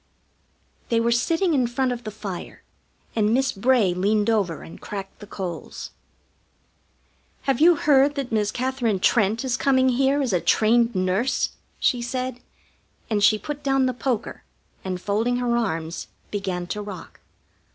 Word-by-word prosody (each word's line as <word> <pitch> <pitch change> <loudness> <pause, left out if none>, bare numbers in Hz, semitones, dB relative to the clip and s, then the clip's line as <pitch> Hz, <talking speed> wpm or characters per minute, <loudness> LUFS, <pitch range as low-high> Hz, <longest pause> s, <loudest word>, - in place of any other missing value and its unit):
They 230 - +2
were 230 +1 +1
sitting 330 +9 +2
in 255 -4 +2
front 255 +1 0
of 240 -2 -5
the - - -3
fire, 205 -4 -7 0.5
and 220 0 +2
Miss 270 +1 +2
Bray 215 -3 +2
leaned 205 +4 +1
over 190 -8 0
and - - -12
cracked 195 -2 -7
the 205 - -11
coals. 185 -4 -6 1.5
"Have 270 0 0
you 340 +2 +7
heard 285 -1 +4
that 275 -4 -3
Miss 210 -2 +1
Katherine 250 -4 -1
Trent 215 +4 +2
is 250 -2 0
coming 260 -1 +3
here 270 +3 +2
as 260 -7 0
a 180 - +2
trained 230 +1 +3
nurse?" 185 +7 +1 0.3
she 245 - +2
said, 255 +1 -3 0.7
and 205 -2 +1
she 215 +1 +6
put 295 +5 -6
down 270 -1 +2
the 255 - 0
poker, 240 -2 -3 0.4
and, 185 -1 -3
folding 215 +6 0
her 245 -1 0
arms, 165 -8 -2 0.2
began 190 -3 -3
to 210 +4 -4
rock. 200 -4 -9
235 Hz, 155 wpm, -24 LUFS, 205-260 Hz, 1.5 s, you